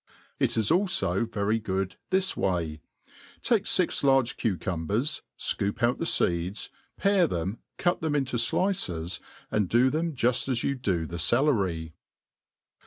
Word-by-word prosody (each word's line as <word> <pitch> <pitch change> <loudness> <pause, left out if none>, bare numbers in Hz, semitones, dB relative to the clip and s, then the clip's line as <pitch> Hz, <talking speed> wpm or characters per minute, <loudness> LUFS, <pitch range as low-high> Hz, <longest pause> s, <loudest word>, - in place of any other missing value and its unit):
It - - +1
is 110 -2 +2
alfo 185 -8 +2
very 105 +2 0
good 95 -2 -2
this 190 0 +1
way: 85 -5 -1 0.6
take - - +2
fix - - +2
large 135 -3 +3
cucpmbers, 105 - -1 0.2
fcoop 100 +3 0
out 120 +1 +2
the 165 - -1
feeds, 85 +4 0 0.3
pare 195 -3 +3
them, 95 - -3 0.2
cut 175 0 0
tKe(}i 155 -2 0
into 135 -3 -1
dices, 100 - 0 0.3
and 105 -4 +1
do 125 +3 +4
them 160 0 -1
juft 125 +2 +1
as 120 -2 0
you 140 - +1
do 95 -11 -1
the 85 +2 -6
celery. 95 - +1
115 Hz, 140 wpm, -27 LUFS, 95-145 Hz, 0.6 s, do